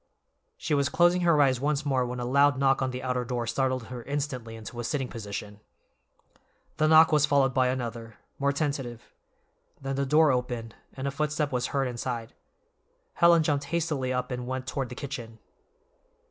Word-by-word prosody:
She 160 Hz, -, -2 dB
was 140 Hz, -1 st, +2 dB
closing 175 Hz, +2 st, +3 dB
her 170 Hz, -3 st, +4 dB
eyes 130 Hz, -3 st, +3 dB
once 150 Hz, +1 st, 0 dB
more 135 Hz, -3 st, +1 dB
when 125 Hz, 0 st, -5 dB
a 120 Hz, -, -3 dB
loud 140 Hz, +2 st, +4 dB
knock 135 Hz, 0 st, +2 dB
on 130 Hz, -, 0 dB
the 125 Hz, 0 st, -6 dB
outer 125 Hz, -1 st, -1 dB
door 120 Hz, -1 st, -3 dB
startled 130 Hz, +1 st, -1 dB
her 125 Hz, +1 st, -8 dB
instantly 130 Hz, -4 st, -4 dB
into 110 Hz, +2 st, -9 dB
a -, -, -3 dB
sitting 135 Hz, +1 st, -2 dB
position. 105 Hz, -2 st, -7 dB, 1.2 s
The 155 Hz, -, +3 dB
knock 160 Hz, +1 st, +7 dB
was 150 Hz, -1 st, +4 dB
followed 140 Hz, -3 st, +3 dB
by 130 Hz, 0 st, +3 dB
another, 115 Hz, -3 st, -4 dB, 0.2 s
more 140 Hz, 0 st, +2 dB
tentative; 140 Hz, -5 st, -3 dB, 0.8 s
then 135 Hz, 0 st, -4 dB
the 140 Hz, 0 st, 0 dB
door 155 Hz, +1 st, +5 dB
opened, 120 Hz, -3 st, -3 dB, 0.2 s
and 135 Hz, +1 st, -4 dB
a -, -, -1 dB
footstep 150 Hz, +1 st, -1 dB
was 125 Hz, -1 st, -1 dB
heard 135 Hz, -2 st, 0 dB
inside. 120 Hz, -1 st, -4 dB, 0.8 s
Helen 170 Hz, -1 st, +5 dB
jumped 145 Hz, -2 st, 0 dB
hastily 150 Hz, -5 st, -1 dB
up 125 Hz, +1 st, -2 dB
and 125 Hz, 0 st, -4 dB
went 130 Hz, 0 st, -3 dB
toward 130 Hz, -1 st, -3 dB
the 125 Hz, -, -8 dB
kitchen. 120 Hz, -5 st, -7 dB
130 Hz, 180 wpm, -27 LUFS, 125-145 Hz, 1.2 s, knock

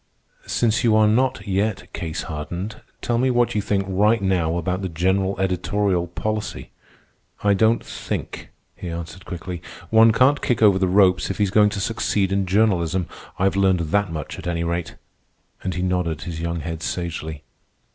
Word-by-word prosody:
"Since 120 Hz, +1 st, +1 dB
you 115 Hz, -2 st, +4 dB
are 110 Hz, 0 st, +5 dB
not 125 Hz, +3 st, +1 dB
yet 100 Hz, -1 st, -1 dB
case 80 Hz, -2 st, -4 dB
hardened, 85 Hz, +7 st, -5 dB, 0.2 s
tell 120 Hz, -1 st, +1 dB
me 130 Hz, +1 st, +2 dB
what 120 Hz, -1 st, +2 dB
you 105 Hz, -, 0 dB
think 100 Hz, -1 st, 0 dB
right 105 Hz, +4 st, +3 dB
now 90 Hz, -4 st, 0 dB
about 90 Hz, +3 st, -2 dB
the 95 Hz, -, -3 dB
general 95 Hz, +4 st, 0 dB
editorial 95 Hz, 0 st, 0 dB
policy." 110 Hz, +5 st, -4 dB, 0.7 s
"I 100 Hz, -1 st, +4 dB
don't 110 Hz, +3 st, +2 dB
think," -, -, -5 dB, 0.3 s
he 90 Hz, -, -7 dB
answered 85 Hz, +2 st, -7 dB
quickly. 90 Hz, 0 st, -6 dB, 0.3 s
"One 110 Hz, 0 st, +7 dB
can't 130 Hz, +5 st, +3 dB
kick 120 Hz, -5 st, +1 dB
over 100 Hz, -3 st, +6 dB
the 95 Hz, -, +2 dB
ropes 95 Hz, -1 st, +3 dB
if 95 Hz, -, -3 dB
he's 100 Hz, -3 st, +1 dB
going 105 Hz, 0 st, +5 dB
to 100 Hz, -, -4 dB
succeed 100 Hz, -2 st, 0 dB
in 95 Hz, -1 st, 0 dB
journalism. 95 Hz, -3 st, +2 dB, 0.3 s
I've 95 Hz, +2 st, +1 dB
learned 95 Hz, -2 st, +3 dB
that 100 Hz, -3 st, +1 dB
much, 75 Hz, -3 st, -5 dB
at -, -, -7 dB
any 85 Hz, -1 st, -1 dB
rate." 85 Hz, -1 st, -3 dB, 0.7 s
And 95 Hz, -2 st, -2 dB
he 90 Hz, -, -2 dB
nodded 90 Hz, -4 st, -1 dB
his 80 Hz, -2 st, -5 dB
young 85 Hz, 0 st, -2 dB
head 80 Hz, +1 st, -5 dB
sagely. 80 Hz, -3 st, -4 dB
95 Hz, 175 wpm, -22 LUFS, 85-105 Hz, 0.7 s, One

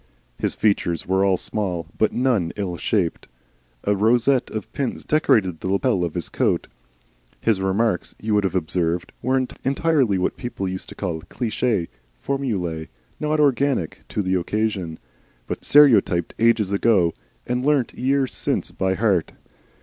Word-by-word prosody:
His -, -, -1 dB
features 95 Hz, -6 st, +1 dB
were 95 Hz, +1 st, +2 dB
all 95 Hz, -2 st, +3 dB
small, 90 Hz, -6 st, -2 dB
but 110 Hz, -, +2 dB
none 120 Hz, -10 st, +1 dB
ill 95 Hz, -4 st, -3 dB
shaped. 90 Hz, -1 st, -1 dB, 0.6 s
A 105 Hz, -, +2 dB
rosette 120 Hz, +5 st, +3 dB
of 110 Hz, -3 st, -6 dB
pins 135 Hz, -3 st, -3 dB
decorated 100 Hz, -, +2 dB
the -, -, -4 dB
lappel 100 Hz, 0 st, +1 dB
of 85 Hz, -3 st, -3 dB
his 85 Hz, -, -3 dB
coat. -, -, 0 dB, 0.7 s
His 110 Hz, -4 st, +1 dB
remarks, 95 Hz, +1 st, 0 dB
you 110 Hz, 0 st, -2 dB
would 105 Hz, -1 st, +3 dB
observe, 85 Hz, 0 st, 0 dB, 0.2 s
were 130 Hz, +2 st, +1 dB, 0.3 s
entirely 135 Hz, -6 st, +2 dB
what 90 Hz, -, -1 dB
people 120 Hz, -6 st, -4 dB
used 95 Hz, 0 st, -5 dB
to -, -, -10 dB
call 85 Hz, -5 st, -3 dB
cliche, 110 Hz, -6 st, -1 dB, 0.3 s
formulae 90 Hz, -, -2 dB, 0.3 s
not 150 Hz, 0 st, 0 dB
organic 140 Hz, -, +1 dB
to 105 Hz, -, -1 dB
the 95 Hz, 0 st, 0 dB
occasion, 95 Hz, -2 st, -1 dB, 0.5 s
but -, -, -5 dB
stereotyped 120 Hz, -, +5 dB
ages 115 Hz, -3 st, +3 dB
ago 100 Hz, -5 st, +3 dB, 0.3 s
and 125 Hz, +1 st, -1 dB
learnt 140 Hz, -4 st, +2 dB
years 135 Hz, +1 st, 0 dB
since -, -, -1 dB
by 95 Hz, 0 st, 0 dB
heart. 100 Hz, -5 st, +1 dB
105 Hz, 145 wpm, -22 LUFS, 90-125 Hz, 0.7 s, stereotyped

